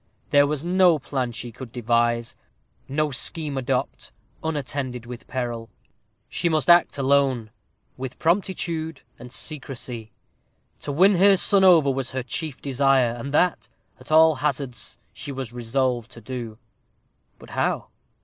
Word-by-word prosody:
There 145 0 +6
was 150 0 -2
no 180 -1 +4
plan 130 -3 -3
she 120 0 -6
could 120 +1 -10
devise 120 -1 0 0.5
no 150 +2 0
scheme 150 +2 -1
adopt, 130 -1 -2 0.3
unattended 135 -5 -3
with 120 0 -9
peril. 120 -3 -4 0.6
She 170 - -1
must 155 +1 +3
act 175 -3 +5
alone 135 -5 +2 0.5
with 130 -1 -6
promptitude 165 -3 -1 0.2
and 125 - -10
secrecy. 125 -5 -5 0.7
To 145 - -4
win 185 +6 +5
her 195 +2 +6
son 195 +1 +4
over 165 -7 +6
was 135 -1 -2
her 130 -1 -2
chief 150 +2 -5
desire, 135 -2 +3
and 120 +4 -6
that, 180 +2 +2 0.3
at - - -11
all 160 0 +7
hazards, 135 -3 -3 0.2
she 145 - -7
was 130 -3 -6
resolved 120 0 -1
to 115 - -11
do. 115 -2 -6 0.8
But - - -14
how? - - -1
135 Hz, 140 wpm, -24 LUFS, 120-155 Hz, 0.8 s, all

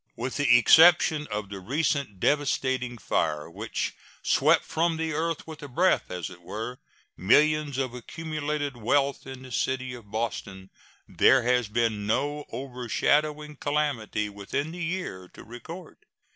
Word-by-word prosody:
With 125 +2 -4
the 135 -4 +6
exception 160 +2 +6
of 105 -1 -4
the 100 -1 -6
recent 140 - -1
devastating 130 -2 0
fire 75 -7 -1
which - - -3 0.3
swept - - +3
from 165 0 0
the 160 -1 -2
earth 165 +1 -2
with 160 -1 -10
a 145 - -7
breath, 175 +8 +2
as 90 -1 -5
it 90 -1 -13
were, 110 +8 -6 0.4
millions 150 +7 +3
of 130 -2 -1
accumulated 150 +2 -4
wealth 135 +5 0
in 130 -1 -8
the 130 - -11
city 130 +1 -1
of 115 -4 -11
Boston, 100 -3 -4 0.4
there 130 -1 +4
has 125 -1 +2
been 110 -1 -1
no 145 +6 -1
overshadowing 145 +4 -1
calamity 140 -9 -1
within 105 +9 -4
the 175 +1 -5
year 165 - -4
to - - -11
record. 125 +10 -10
130 Hz, 145 wpm, -27 LUFS, 115-150 Hz, 0.4 s, the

